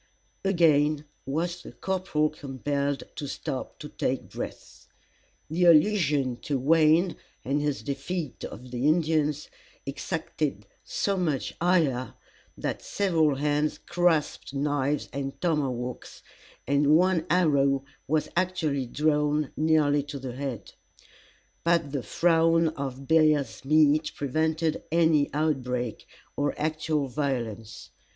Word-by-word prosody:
Again 155 -5 +3 0.2
was 170 +5 -2
the - - -11
corporal 180 -5 -1
compelled 140 -1 -2
to 145 - -4
stop - - -5
to - - -8
take - - -3
breath. - - -8 0.6
The 175 +3 +1
allusion 150 - +4
to 140 +2 -2
Wayne, 160 +5 +3 0.3
and 140 +3 0
his 145 -2 -2
defeat 145 +2 -4
of 125 +4 -9
the 125 +3 0
Indians, 155 -2 +1 0.4
excited - - -3 0.2
so 200 -1 -1
much 155 -8 -1
ire, 160 -8 +1 0.4
that - - -3
several 165 -7 +1
hands 150 +2 0
grasped 170 -5 0
knives 145 0 0
and 135 -1 -4
tomahawks, 130 -7 -2 0.4
and 140 +2 +4
one 180 -1 +2
arrow 140 -6 +3 0.2
was 155 0 +1
actually 170 -7 0
drawn 150 +1 +1
nearly 150 -2 +3
to 145 0 -7
the 130 -2 -6
head; 135 -4 -5 0.9
but 170 -4 +2
the 140 -2 -2
frown 165 +6 +3
of 135 -3 -6
Bear's 155 -7 +3
Meat 150 +1 +3
prevented 155 +3 0
any 160 -3 +3
outbreak, 125 -6 -2 0.3
or 145 0 -1
actual 155 -1 -1
violence. 120 -6 -4
150 Hz, 115 wpm, -27 LUFS, 140-160 Hz, 0.9 s, allusion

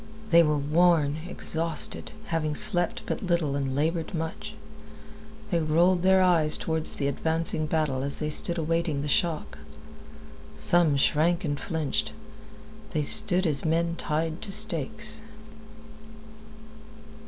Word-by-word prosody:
They 170 0 +7
were 150 -2 +1
worn, 155 0 +1
exhausted, 165 -2 -2
having 155 -2 -3
slept 175 -4 +3
but - - -4
little 170 -6 -1
and 135 -2 -3
labored 165 +5 -2
much. 170 +7 -6 1.0
They 170 - +1
rolled 170 +3 +2
their 190 +1 +3
eyes 165 -4 +3
toward 160 -1 -3
the 140 - +1
advancing 160 +1 -2
battle 150 -5 -1
as 140 +1 -2
they 150 0 -2
stood 170 +3 +1
awaiting 160 -3 -2
the - - -4
shock. 160 +1 -2 1.0
Some 170 -5 +6
shrank 170 +6 +1
and 145 -2 -3
flinched. 160 +6 -3 0.8
They 155 -2 -1
stood 195 +1 +2
as 145 -5 -1
men 170 +1 0
tied 160 +1 -3
to 200 - -7
stakes. 215 +2 0
165 Hz, 125 wpm, -26 LUFS, 150-175 Hz, 1.0 s, They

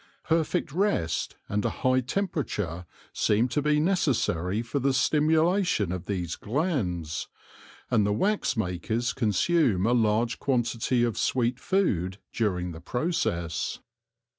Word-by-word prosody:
Perfect 160 -3 0
rest 175 - 0
and 105 0 -1
a - - +1
high 130 0 +1
temperature 130 - -2 0.3
seem 110 +4 +2
to 145 - 0
be 150 +1 +2
neces 170 -4 +2
sary 90 +4 -1
for 120 +5 -2
the 135 0 +1
stimulation 160 - +2
of 90 -1 -4
these 90 -4 -2
glands, 105 - -2 0.6
and 110 -3 +4
the 100 - +1
wax 200 - 0
makers 110 +5 -1
consume 115 - +2
a 120 - +3
large 115 0 +1
quantity 120 -1 +1
of 115 -2 0
sweet 125 0 +1
food 95 - 0 0.2
during 90 -5 -1
the 80 0 -9
process. 85 - -1
120 Hz, 130 wpm, -27 LUFS, 95-150 Hz, 0.6 s, and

